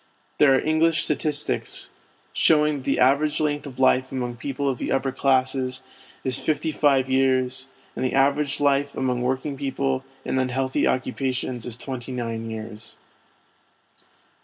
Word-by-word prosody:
There 135 -3 +6
are - - +3
English 155 +2 +2
statistics 150 -1 -2 0.4
showing 150 -2 +3
that 135 - -8
the 135 - +1
average 140 +4 +3
length 145 -1 -1
of 130 -3 -10
life 130 0 +3
among 125 -2 -3
people 140 +3 -3
of 130 -3 -1
the - - -3
upper 135 0 +1
classes 130 -1 0 0.4
is 130 -1 +2
fifty 155 +1 -1
five 140 -4 +2
years, 130 0 +1 0.3
and - - -3
the 130 - 0
average 140 +1 +2
of - - -6
life 140 0 +2
among 125 -2 -1
working 130 +3 -1
people 70 - -1 0.2
in 130 - 0
unhealthy 130 +1 0
occupations 130 -2 -2
is 120 -1 -5
twenty 130 0 -6
nine 115 -2 -4
years. 110 0 -8
130 Hz, 150 wpm, -24 LUFS, 125-145 Hz, 0.4 s, There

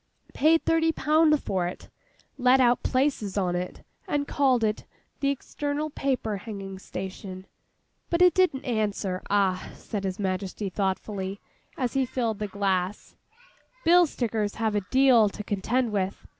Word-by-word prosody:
Paid 320 +3 +3
thirty 325 0 +3
pound 305 -1 +3
for 185 -2 -1
it; 180 - -8 0.5
let 255 0 +4
out 245 -1 +4
places 255 -7 0
on 180 -3 +1
it, 180 +1 -5 0.2
and 290 -5 -1
called 260 -5 +2
it 215 -1 0 0.4
"The 275 - +1
External 290 +2 -3
Paper 255 -7 -1
Hanging 195 -2 -7
Station." 190 0 -7 0.6
But 340 +1 +3
it 360 -2 +6
didn't 340 -7 +2
answer. 205 -6 -1
Ah!' 195 -2 +1
said 205 -3 -5
His 190 -1 -2
Majesty 190 0 -3
thoughtfully, 195 0 -2 0.4
as 250 -3 -1
he 270 -1 +1
filled 230 -4 -2
the 210 - -2
glass, 195 -1 -2 0.7
'Bill 350 +1 +6
stickers 220 -6 -2
have 220 -2 0
a 205 - +1
deal 255 -5 +5
to 210 - -7
contend 225 +4 0
with. 195 -1 -2
220 Hz, 145 wpm, -26 LUFS, 195-270 Hz, 0.7 s, it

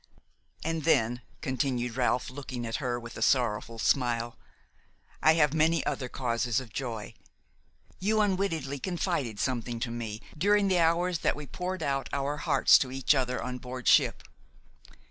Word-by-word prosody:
"And 165 -1 -2
then," 120 -6 +2 0.2
continued 125 -3 -1
Ralph, 125 0 0
looking 130 -3 -6
at 115 - -2
her 125 -3 -2
with 115 0 -9
a - - -7
sorrowful 115 -3 +1
smile, 120 -1 +1 0.9
"I 160 - +6
have 150 -3 +3
many 160 +1 +2
other 125 -2 -2
causes 120 -2 0
of 120 -6 -10
joy. 115 -6 -4 0.9
You 215 +3 +1
unwittingly 185 -9 0
confided 165 - -2
something 120 -2 -2
to 115 - -2
me 110 -2 -5 0.2
during 200 +4 +3
the 185 -2 +3
hours 170 +1 +2
that - - +1
we 150 0 -7
poured 185 +5 -4
out 135 -1 -1
our 140 +1 -1
hearts - - +5
to 130 - -2
each 135 +2 +2
other 125 -2 -1
on 125 0 -4
board 125 -1 -7
ship. - - +4
130 Hz, 155 wpm, -29 LUFS, 120-160 Hz, 0.9 s, I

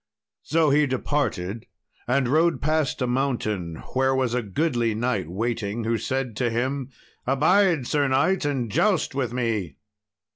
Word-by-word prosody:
So 160 -2 +2
he 150 +1 +4
departed 120 -7 -2 0.4
and 130 +1 +2
rode 160 +5 +2
past 155 -3 0
a - - +2
mountain 120 -9 -1 0.2
where 130 +1 +2
was 130 -3 0
a 125 - +1
goodly 120 - 0
knight 120 -7 -1
waiting, 110 +2 -2
who 115 0 0
said 130 0 -2
to 125 -2 +1
him, 130 +3 -2 0.4
"Abide, 160 +2 +3
Sir 145 +2 +1
knight, 140 +9 +2
and 135 -6 -1
joust 190 - +2
with 130 -4 -1
me!" 110 - -2
130 Hz, 145 wpm, -24 LUFS, 115-145 Hz, 0.4 s, he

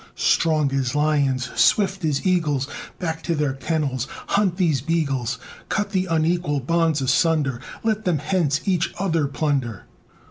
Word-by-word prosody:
Strong 155 -4 +2
as 135 0 0
lions, 140 -4 +1
swift 195 -2 +3
as 150 0 0
eagles, 150 -7 +1 0.3
Back 160 -2 -3
to 170 - -1
their 150 -3 0
kennels 135 -2 -2 0.2
hunt 200 -3 +2
these 160 -9 +2
beagles! 140 -5 -1 0.3
Cut 205 -1 -1
the 190 -2 0
unequal 165 -2 +1
bonds 165 +1 +1
asunder! 135 0 +1 0.2
Let 220 -1 0
them 175 -4 +2
hence 150 -1 0
each 180 -4 0
other 165 -6 +1
plunder! 135 - -2
155 Hz, 140 wpm, -23 LUFS, 135-175 Hz, 0.3 s, swift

